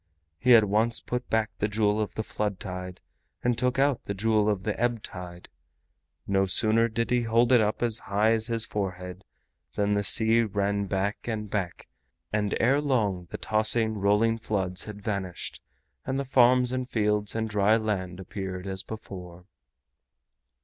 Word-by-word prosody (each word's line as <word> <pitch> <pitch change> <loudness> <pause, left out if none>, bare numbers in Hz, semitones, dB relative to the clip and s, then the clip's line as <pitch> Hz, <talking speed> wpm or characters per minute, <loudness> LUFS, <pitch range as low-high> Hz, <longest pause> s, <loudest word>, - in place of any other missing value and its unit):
He 125 +5 +6
at 110 - +7
once 110 +3 +1
put 125 +1 -4
back 110 -1 +1
the 105 - 0
Jewel 105 0 +1
of 105 -2 -4
the 110 - -2
Flood 105 -3 -3
Tide 90 -1 -7 0.4
and 120 0 +2
took 125 +2 0
out 140 -2 +1
the 100 - -4
Jewel 110 +1 +2
of 100 -2 -1
the 105 0 -1
Ebb 120 -2 0
Tide. 90 -1 -9 0.8
No 95 -1 +1
sooner 110 +4 +3
did 115 +1 -2
he 125 -1 +3
hold 115 +2 +2
it 125 -3 +6
up 105 +2 0
as 115 -1 +1
high 105 +3 +1
as 115 0 +2
his 115 -1 0
forehead 90 -4 -5 0.5
than 105 0 +1
the 100 0 +1
sea 115 +3 +4
ran 100 -2 -1
back 100 +4 -2
and 105 -3 -4
back, 95 -5 -3 0.5
and 105 -1 0
ere 135 +5 +3
long 105 -11 0
the - - -5
tossing 110 +1 +1
rolling 105 +3 +2
floods 95 -4 -1
had 105 -1 -9
vanished, 100 -5 -4 0.4
and 135 +1 -2
the 140 - -2
farms 125 -1 +4
and 130 0 -3
fields 105 -1 0
and 110 0 -1
dry 105 +1 +3
land 95 -5 -3
appeared 95 -1 -6
as 95 -1 -3
before. 90 -5 -9
105 Hz, 170 wpm, -27 LUFS, 100-115 Hz, 0.8 s, at